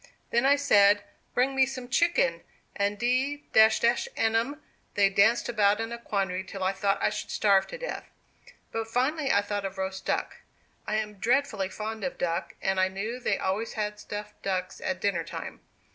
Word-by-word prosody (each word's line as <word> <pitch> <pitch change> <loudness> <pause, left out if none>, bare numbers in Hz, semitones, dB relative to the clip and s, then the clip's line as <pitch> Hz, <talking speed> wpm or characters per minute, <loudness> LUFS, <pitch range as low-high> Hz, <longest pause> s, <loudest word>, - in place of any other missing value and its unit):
Then 235 +3 +3
I 280 - +6
said, 205 -7 +5 0.3
'Bring 260 +2 +2
me 265 -1 +4
some 255 -2 -6
chicken,' 340 - +2 0.3
and 200 +1 0
d 260 +5 0
n 225 0 +3
'em, 265 +7 0 0.4
they 200 -1 +4
danced 200 +4 +3
about 210 -3 +3
in 225 +1 -3
a 235 - -5
quandary 195 -5 -2
till 190 0 -6
I 185 - +2
thought 195 +1 +1
I - - +3
should - - -5
starve 200 -2 +3
to - - -7
death. - - -6 0.6
But 225 0 -3
finally 270 +5 0
I 200 - +3
thought 205 0 -3
of 195 0 -5
roast 190 0 -3
duck. - - -1 0.5
I 215 - 0
am 210 -2 -3
dreadfully 235 -5 +1
fond 220 +2 -5
of 270 - -3
duck, 170 +1 -2
and 190 0 +1
I 185 - +4
knew 205 +6 -4
they 250 - 0
always 205 +4 -2
had 210 -1 -3
stuffed 210 0 -8
ducks 185 -2 -3
at 270 - -2
dinner 190 -5 0
time. 165 - -7
215 Hz, 185 wpm, -28 LUFS, 195-245 Hz, 0.6 s, I